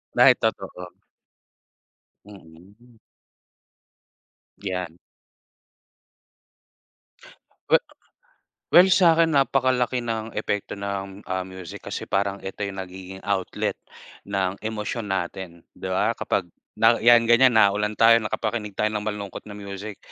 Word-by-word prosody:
Dahil - - +7
totoo. 90 -1 -4 1.3
Mm 95 -1 -16
mm. 120 -1 -22 1.6
'Yan. 90 -4 -5 2.7
We - - +7 1.0
well 180 +2 +8
sa'kin 165 -3 +5
napakalaki 130 -2 +2
ng 115 -1 -4
epekto 105 -1 -3
ng, 100 0 -5
ah, 95 0 -1
music 95 -3 -10
kasi - - -5
parang 100 0 0
ito 95 +2 -6
yung 100 -1 -7
nagiging 95 +1 -10
outlet 100 -2 -2 0.5
ng 95 -1 -1
emosyon 110 +1 -4
natin, 90 -2 -4
'di - - -8
ba 95 +4 +1
kapag 95 - -1 0.3
na 115 +1 +4
'yan 120 +1 +6
ganiyan 120 +2 +5
naulan 105 0 +3
tayo 115 +1 +6
nakapakinig 110 -1 -3
tayo 105 +2 0
ng 105 0 -4
malungkot 105 -2 -5
na 105 - -9
music, 100 0 -8
100 Hz, 110 wpm, -24 LUFS, 95-115 Hz, 2.7 s, well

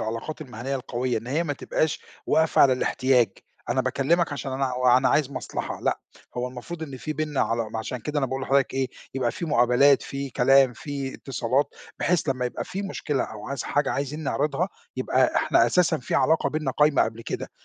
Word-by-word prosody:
العلاقات 115 +8 -4
المهنيّة 130 -1 -5
القويّة، 125 -2 -2
إن 115 - -11
هي 150 +7 0
ما 150 - -1
تبقاش 150 +2 -1 0.3
واقفة 160 0 +4
على 135 - +6
الاحتياج. 130 -2 +2 0.4
أنا 130 - +2
باكلّمك 140 +6 +1
عشان 135 -1 -4
أنا 135 -1 -1
وأنا 125 +1 +4
عايز 145 -2 +2
مصلحة 130 -6 -5
لأ، - - 0 0.4
هو 125 +1 -1
المفروض 130 +7 -8
إن 140 -4 -6
في 155 - -4
بيننا 150 -1 -2
علا 115 -1 0
عشان 120 +3 -4
كده 150 +6 -3
أنا 135 - +1
باقول 130 +1 -4
لحضرتك 135 0 +2
إيه، 135 -1 0 0.3
يبقى 130 -3 0
في 170 - -5
مُقابلات، 130 0 +4
في 140 -1 -5
كلام، 135 +1 +5
في 140 0 -5
اتصالات 135 +2 -1 0.2
بحيث 170 -3 +1
لمّا 130 -2 0
يبقى 125 - -4
في 195 +2 -5
مشكلة 150 -8 -2
أو 105 -1 -9
عايز 140 -3 -3
حاجة 145 -1 0
عايزين 145 +3 -3
نعرضها 150 +4 0 0.3
يبقى 130 0 +2
إحنا 115 - +4
أساسًا 165 +4 +2
في 125 - -4
علاقة 155 +4 +3
بيننا 155 -3 -1
قايمة 150 +2 +4
قبل 115 +1 -3
كده - - -5
135 Hz, 190 wpm, -25 LUFS, 125-150 Hz, 0.4 s, على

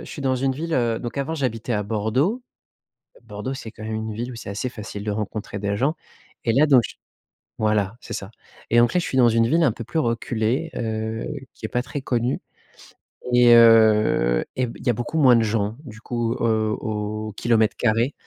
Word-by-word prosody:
je - - -11
suis 145 - -7
dans 130 -1 +1
une 135 +1 0
ville, 165 +5 -5
heu, 120 -5 +1
donc 120 +3 -6
avant, 140 +4 -2
j'habitais 125 -5 -2
à 105 - 0
Bordeaux. 115 - 0 0.8
Bordeaux, 130 +1 -5
c'est 115 -4 -8
quand 110 - -11
même 110 0 -4
une 110 0 -4
ville 120 +4 -4
où - - -8
c'est 115 - -8
assez 105 +6 -3
facile 105 -3 -7
de 105 - -3
rencontrer 105 0 -4
des 100 0 -2
gens 140 +8 +1 0.5
et 115 - +2
là 140 +5 +5
donc 135 -4 +6
j - - -13 0.6
voilà, 105 -1 0
c'est - - -9
ça, 95 - -5 0.4
et 115 - +2
donc, 120 0 +4
là, 180 - +2
je - - -4
suis - - -3
dans 120 -2 +6
une 115 0 +3
ville 165 +7 +2
un 145 -8 +3
peu 115 - -8
plus 160 - -3
reculée, 120 +3 -1
heu, 110 -1 -3 0.3
qui - - -15
est - - -1
pas 125 - 0
très 140 +2 -6
connue 125 -1 0 0.9
et 120 -1 +7
heu, 110 - +5
et 130 - +1
b 115 - -9
il - - -12
y - - +5
a - - +4
beaucoup 120 +7 -4
moins 130 -5 +6
de 115 - +3
gens, 105 0 -1
du 110 -5 -11
coup, 115 -1 -2
heu, 110 -2 +1
au 105 0 -4
au - - -7
kilomètre 110 0 +1
carré. 115 +4 +1
115 Hz, 225 wpm, -23 LUFS, 110-130 Hz, 0.9 s, et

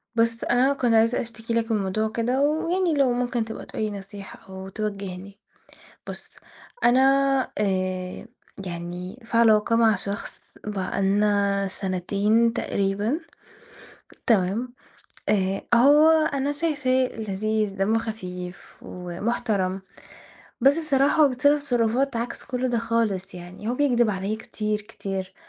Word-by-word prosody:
بُص 230 0 +1
أنا 255 +3 +3
كنت 245 -4 +1
عايزة 225 +2 +3
أشتكي 230 0 -6
لك 230 0 0
من 220 - +2
موضوع 215 +3 -1
كده 240 +4 0
ويعني 330 +4 +1
لو 275 -4 +3
ممكن 245 -1 -1
تبقى 225 - -7
تقول - - -6
لي 215 - -1
نصيحة 200 0 -9
أو 190 0 -8
توجّهني، 200 -1 -5 0.7
بُص - - -7 0.5
أنا 245 +2 +5 0.6
آآ 185 -1 -2 0.4
يعني 175 +5 -6
في 230 - -3
علاقة 225 0 +4
مع 225 -2 +5
شخص 200 +3 -5 0.2
بقى 200 -1 -2
لنا 200 0 +2
سَنتين 200 +5 +1
تقريبًا 205 - -1 1.1
تمام؟ 225 +3 +1 0.5
آآ 195 -2 +1
أ - - +5
هو 290 +6 +6 0.2
أنا 280 +1 0
شايفاه 285 -5 +1
لذيذ، 215 -1 -1
دمّه 205 +4 +2
خفيف 185 -5 -7
ومحترم 190 +1 -2 0.8
بس 275 +5 +5
بصراحة 300 -1 +3
هو 290 - +6
بيتصرف 285 +3 +2
تصرفات 245 0 +1
عكس 235 +1 -4
كل 255 -2 -2
ده 240 -1 0
خالص، 220 -5 -1
يعني 180 +4 -8
هو 240 - 0
بيكدب 245 -5 +2
عليّا 195 +2 -2
كتير، 215 -1 -3
كتير 195 -2 -6
220 Hz, 130 wpm, -24 LUFS, 195-245 Hz, 1.1 s, هو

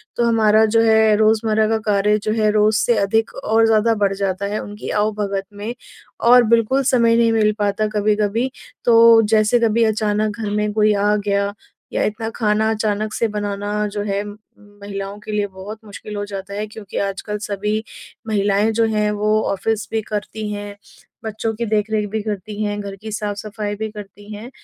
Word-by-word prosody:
तो 240 - +1
हमारा 220 -1 +4
जो 225 +1 +3
है 220 -1 +4
रोज़मर्रा 220 0 +2
का 225 - +2
कार्य 210 0 +2
जो 215 - -1
है 215 - +3
रोज़ 215 0 +3
से 240 - +3
अधिक 220 +3 +1
और 225 +1 +3
ज़्यादा 225 +1 +3
बढ़ 195 - +2
जाता 195 0 -2
है 205 +2 -2
उनकी 205 +1 -8
आओ-भगत 205 -2 -1
में, 210 +3 -5 0.5
और 245 +1 +6
बिल्कुल 235 +4 +2
समय 235 -3 +3
नहीं 230 -1 +3
मिल 215 -1 +3
पाता 205 +1 0
कभी-कभी। 215 +4 +1 0.3
तो 230 -1 +7
जैसे 215 +2 +4
कभी 230 0 +2
अचानक 215 -1 0
घर 215 - -3
में 210 0 0
कोई 215 0 +3
आ 205 +1 +2
गया, 200 0 -1 0.4
या - - +1
इतना 220 +1 -2
खाना 215 -1 +1
अचानक 215 0 -1
से 230 - 0
बनाना 205 0 -2
जो 205 0 -4
है 200 -1 -1
उम्म, 205 0 -9 0.4
महिलाओं 200 0 -6
के 210 - -8
लिए 210 -1 0
बहुत 195 +3 -9
मुश्किल 210 0 -9
हो 205 - -3
जाता 200 -1 -7
है 210 +1 -3
क्योंकि 210 -2 -9
आजकल 200 +1 -3
सभी 210 +1 -2 0.4
महिलाएँ 205 +1 +1
जो 230 +1 +2
हैं 210 0 +1
वो 215 +1 +1
ऑफिस 215 +2 -2
भी 220 0 0
करती 210 0 -5
हैं, 205 0 -6 0.5
बच्चों 220 +1 -3
की 235 +2 -3
देख-रेख 215 0 0
भी 220 0 -2
करती 210 0 -5
हैं, 205 0 -2
घर 200 -1 -7
की 220 +2 -9
साफ-सफाई 210 0 -4
भी 220 +1 -4
करती 205 0 -11
हैं, 215 +4 -8
210 Hz, 185 wpm, -20 LUFS, 205-220 Hz, 0.5 s, तो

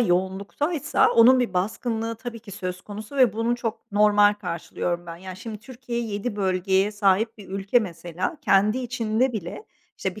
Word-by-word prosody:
yoğunluktaysa 200 - +1
onun 250 +3 +7
bir 230 -7 -1
baskınlığı 225 +4 -1
tabii 235 -1 -7
ki 210 - -12
söz 185 -2 -5
konusu 215 +6 -8
ve 250 -6 +5
bunu 230 +2 0
çok 225 -3 -5
normal 205 0 +5
karşılıyorum 175 -2 -4
ben. 165 0 -7
Ya, 185 +1 -8
şimdi 215 +2 -7
Türkiye 240 0 -5
7 210 0 -3
bölgeye 190 +1 +1
sahip 205 +2 +2
bir 200 - -12
ülke 195 +5 +2
mesela 175 - -4
kendi 210 +5 +3
içinde 245 0 0
bile, 205 - -6 0.3
işte, 190 0 -3
bir, - - -9
210 Hz, 165 wpm, -24 LUFS, 190-235 Hz, 0.3 s, onun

